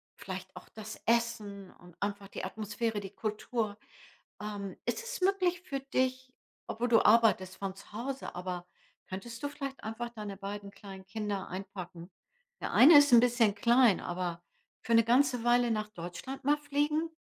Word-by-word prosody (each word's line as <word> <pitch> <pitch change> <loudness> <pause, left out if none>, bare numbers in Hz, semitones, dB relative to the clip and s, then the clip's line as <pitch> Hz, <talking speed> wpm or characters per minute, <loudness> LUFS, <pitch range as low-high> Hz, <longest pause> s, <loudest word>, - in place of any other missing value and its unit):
vielleicht 190 -1 -7
auch 180 - -11
das 220 0 -9
Essen 215 -5 0
und 175 -1 -16
einfach 200 0 -3
die - - -7
Atmosphäre, 215 0 -2
die 195 0 -8
Kultur, 215 0 -2 0.6
ähm. 205 -2 -5
Ist 480 - -2
es 485 -2 -5
möglich 365 -2 +2
für 275 -6 -4
dich 260 -1 -1 0.4
obwohl 240 +2 -1
du 230 -2 +4
arbeitest 210 -4 +4
von 195 -1 -4
zu 200 - -15
Hause, 255 +1 -5
aber 180 -1 -4 0.4
könntest 230 +6 -7
du 285 - -1
vielleicht 275 -2 -6
einfach 225 +2 -4
deine 210 -4 -7
beiden 200 0 -6
kleinen 195 -1 -11
Kinder 205 0 -4
einpacken? 185 -2 -7 0.5
Der - - -3
eine 295 +4 +9
ist 285 -2 +6
'n 235 - +10
bisschen 235 -3 +3
klein, 235 0 +4
aber 175 -1 -3 0.4
für 230 - -1
'ne 230 - +7
ganze 250 +1 +3
Weile 240 0 +4
nach 215 -1 -1
Deutschland 210 +9 -7
mal 295 +1 +4
fliegen? 300 +3 0
220 Hz, 165 wpm, -31 LUFS, 195-255 Hz, 0.6 s, n